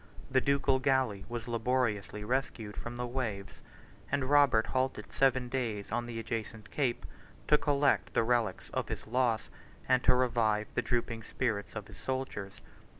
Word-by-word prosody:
The 130 0 +4
ducal 140 -1 +2
galley 130 -8 +1
was 120 -1 -5
laboriously 115 -3 0
rescued 115 -3 -2
from 120 0 -6
the 125 0 -2
waves, 115 -6 -4 0.5
and 135 -2 +1
Robert 140 -6 +5
halted 130 0 -2
seven 130 -2 +3
days 115 -6 -3
on 120 +1 -1
the 120 -1 -5
adjacent 110 -2 -5
cape, 130 -5 0 0.4
to 150 - +6
collect 145 -1 +2
the - - +4
relics 120 -1 0
of - - -2
his - - -4
loss, 120 -1 +1 0.4
and 130 -1 +3
revive 115 -4 +3
the - - +1
drooping 115 -2 -1
spirits 110 -3 -2
of 105 -2 -4
his 100 - -13
soldiers. 110 -4 -3
120 Hz, 150 wpm, -31 LUFS, 110-130 Hz, 0.5 s, to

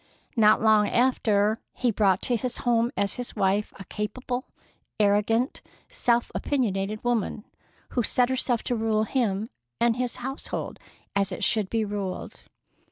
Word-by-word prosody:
Not 215 -1 +5
long 215 -2 +5
after, 220 -4 +2
he 245 -2 +1
brought 195 -3 +2
to 245 - +1
his 245 +2 -3
home 235 0 +3
as 200 +3 +1
his 245 -1 -6
wife 195 +2 +1
a - - -6
capable, 245 +6 -4 0.5
arrogant, 210 +5 +2 0.3
self 240 - +1
opinionated 215 -6 -1
woman, 230 -3 -1 0.4
who 245 - 0
set 245 +2 +2
herself 255 -2 0
to 245 - -1
rule 220 -1 +1
him 220 -3 -1 0.3
and 235 0 +3
his 250 -1 -1
household 265 +3 -5 0.4
as 200 -1 +1
it - - -4
should 215 -4 +2
be 225 -1 0
ruled. 200 -2 -5
225 Hz, 145 wpm, -26 LUFS, 205-245 Hz, 0.5 s, Not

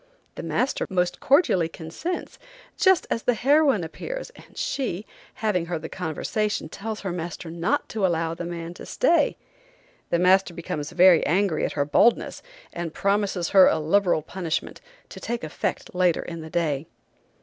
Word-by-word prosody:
The - - -7
master 260 - -1
most 180 -1 0
cordially 230 - +3
consents, 170 - -6 0.4
just 380 -3 +4
as 230 - 0
the 245 - +1
heroine 275 - +3
appears, - - -6
and - - -18
she, 220 -8 -2 0.3
having 185 -6 0
heard 165 -2 -3
the 160 - -5
conversation 185 +2 -2
tells 215 +5 -5
her 195 - -3
master 170 -1 -5
not 170 +1 -1
to 215 -3 -3
allow 165 -3 +1
the 175 - -6
man 170 0 -5
to - - -10
stay. 340 - +2 0.7
The 170 - +2
master 185 0 +3
becomes 155 -3 -4
very 180 -2 +6
angry 180 0 +1
at - - -3
her 145 -1 0
boldness 225 +11 +2 0.3
and 170 -2 -5
promises 200 -3 0
her 190 -2 +7
a - - +3
liberal 165 +1 +2
punishment, 170 -1 -4 0.3
to - - -9
take 235 0 -4
effect 155 - -3
later 180 -2 +2
in 170 -1 -7
the 160 - -8
day. 155 -3 -1
180 Hz, 160 wpm, -25 LUFS, 165-210 Hz, 0.7 s, her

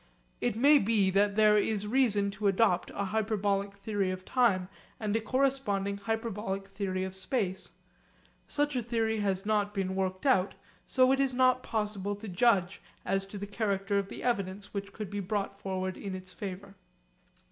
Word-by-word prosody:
It - - 0
may 285 +5 +6
be 200 -3 +2
that 200 +1 +2
there 210 -1 +5
is 210 0 -1
reason 210 -4 +2
to 200 +1 -1
adopt 195 -2 +2
a 200 - -1
hyperbolic 205 -1 0
theory 200 -1 -2
of 185 0 -5
time 205 -8 +2 0.3
and 215 -1 -1
a 225 - +1
corresponding 215 -5 0
hyperbolic 210 -2 -3
theory 195 -2 -2
of 190 0 -5
space. 190 -3 -2 0.8
Such 290 -1 0
a 250 - +1
theory 225 -1 0
has 195 -1 -1
not 210 -1 +1
been 190 -1 -1
worked 190 +2 -2
out, 205 -9 +3 0.3
so 255 0 +4
it 270 - +2
is 270 -2 +1
not 255 0 +4
possible 205 -3 -2
to 210 +2 -9
judge 190 -1 +2 0.2
as 195 0 0
to 205 - -8
the 200 - -4
character 200 -1 0
of 200 0 -4
the - - -8
evidence 200 -4 -2
which 200 -1 -4
could 210 -2 -7
be 205 - -3
brought 200 0 -3
forward 185 -1 -3
in 195 -2 -5
its 185 0 -9
favour. 195 0 -7
200 Hz, 175 wpm, -30 LUFS, 195-220 Hz, 0.8 s, may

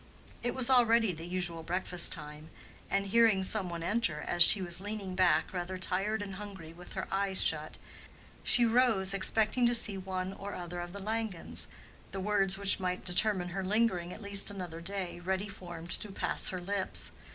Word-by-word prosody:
It 245 - -3
was 260 -2 +1
already 230 -4 +4
the 165 +1 -8
usual 175 -2 -1
breakfast 180 +1 +2
time, 150 0 -6 0.4
and 200 0 0
hearing 215 -1 +3
some 190 -1 +2
one 170 -1 -6
enter 180 -5 -1
as 175 - -3
she 195 - +8
was 175 -1 +1
leaning 205 -2 -5
back 185 0 +2
rather 180 +1 -4
tired 195 +4 -2
and 195 -1 -7
hungry 195 -6 -9
with 175 +1 -13
her - - -5
eyes 195 -1 +2
shut, 155 -1 -2 0.6
she 240 - +5
rose 225 -5 +3
expecting 220 +5 +2
to 240 - +1
see 205 -4 0
one 185 0 -4
or 200 +1 -8
other 175 0 -7
of 175 0 -6
the 200 - -7
Langens—the 215 -2 -6
words 195 -1 +1
which 200 -1 0
might 180 -1 -3
determine 180 0 +3
her 190 +2 -4
lingering 190 -3 0
at 210 - -10
least 200 0 +7
another 180 -5 -7
day, 185 -1 -5
ready 190 +3 -3
formed 175 -3 -9
to 210 - -4
pass - - 0
her 185 - -3
lips. 190 +2 -2
190 Hz, 180 wpm, -30 LUFS, 175-205 Hz, 0.6 s, she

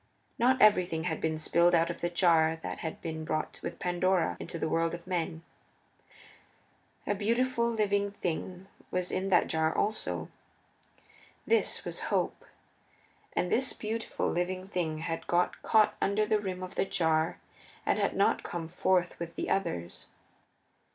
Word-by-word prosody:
Not 255 +2 +4
everything 180 -6 +4
had 160 -2 -2
been 160 -1 0
spilled 170 +2 +3
out 165 0 +3
of - - -9
the 175 - 0
jar 165 -2 +3
that - - -4
had 160 - -5
been 160 -1 -4
brought 155 0 -3
with - - -5
Pandora 180 -1 +1
into - - -6
the 160 - -1
world 165 +1 +1
of 170 - -11
men. 170 -3 -2 1.6
A - - +1
beautiful, 235 +3 +1
living 205 -3 +1
thing 185 0 -4 0.2
was 180 -1 -2
in 190 +1 -1
that 180 - +5
jar 160 0 +1
also. 215 +1 -1 1.2
This 455 - +1
was - - -4
Hope. - - -1 0.9
And 180 - 0
this 255 +1 +2
beautiful, 225 +1 -3
living 185 +2 -2
thing 165 -5 -1
had 165 0 -4
got 175 +1 +1
caught 215 -2 +4
under 205 +2 +2
the 215 0 +2
rim 185 -2 -4
of 185 - -7
the - - +1
jar 160 -3 +1 0.5
and - - +2
had - - +1
not - - +3
come 170 -2 -5
forth 180 +1 +1
with 170 -1 -6
the - - -3
others. 90 - -2
180 Hz, 155 wpm, -30 LUFS, 165-200 Hz, 1.6 s, that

